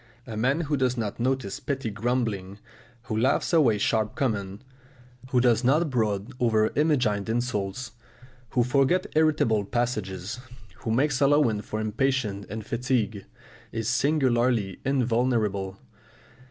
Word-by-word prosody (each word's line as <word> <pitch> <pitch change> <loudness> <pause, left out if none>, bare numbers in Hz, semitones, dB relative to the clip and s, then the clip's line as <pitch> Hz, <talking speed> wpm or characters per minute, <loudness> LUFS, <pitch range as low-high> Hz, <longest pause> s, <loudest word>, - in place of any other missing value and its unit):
A 115 - -7
man 135 +9 +1
who 145 -2 -1
does 130 -1 +1
not 110 -2 -3
notice 130 -5 -1
petty 135 -6 -3
grumbling, 105 -4 -2 0.5
who 110 - -4
laughs 130 +9 +1
away 135 -10 +4
sharp 110 +1 0
comments, 100 -4 -2 0.7
who 130 -1 +3
does 120 -1 +3
not 150 +5 +3
brood 110 -1 -1
over 110 -3 +2
imagined 125 -10 +1
insults, 110 -1 -2 0.6
who 125 0 +2
forgets 135 +8 +2
irritable 150 -9 +3
passages, 105 -2 -3 0.4
who - - -6
makes 135 +3 +1
allowance 140 -7 +3
for 110 - -3
impatience 110 -2 -1
and 110 +1 -6
fatigue, 115 -5 -1 0.5
is 115 -1 -3
singularly 125 - +1
invulnerable. 115 -7 0
120 Hz, 125 wpm, -26 LUFS, 105-130 Hz, 0.7 s, away